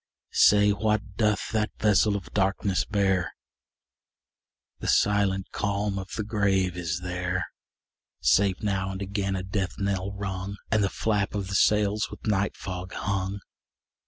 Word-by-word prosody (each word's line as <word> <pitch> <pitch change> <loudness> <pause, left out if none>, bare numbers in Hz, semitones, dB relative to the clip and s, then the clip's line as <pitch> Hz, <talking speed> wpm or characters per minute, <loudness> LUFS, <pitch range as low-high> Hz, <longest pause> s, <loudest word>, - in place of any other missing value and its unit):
Say, 105 0 +6
what 105 -1 -1
doth 105 -2 +1
that 110 -1 -1
vessel 105 0 +3
of 100 - -6
darkness 95 -1 +1
bear? 95 -3 0 1.4
The - - -5
silent 100 -2 +2
calm 100 -1 -1
of 95 0 -7
the 110 - -1
grave 100 -4 +1
is 85 -1 -3
there, 90 0 -2 0.7
Save 95 - +3
now 95 -2 0
and 95 0 -5
again 100 0 -2
a 95 - -3
death 95 -1 -3
knell 100 -1 -1
rung, 100 0 -4
And 110 -2 +3
the 95 - +2
flap 105 -1 -1
of 100 -2 -3
the - - -4
sails 105 +2 +3
with - - -11
night 105 -2 0
fog 90 -1 -6
hung. 100 0 -2
100 Hz, 145 wpm, -27 LUFS, 95-105 Hz, 1.4 s, Say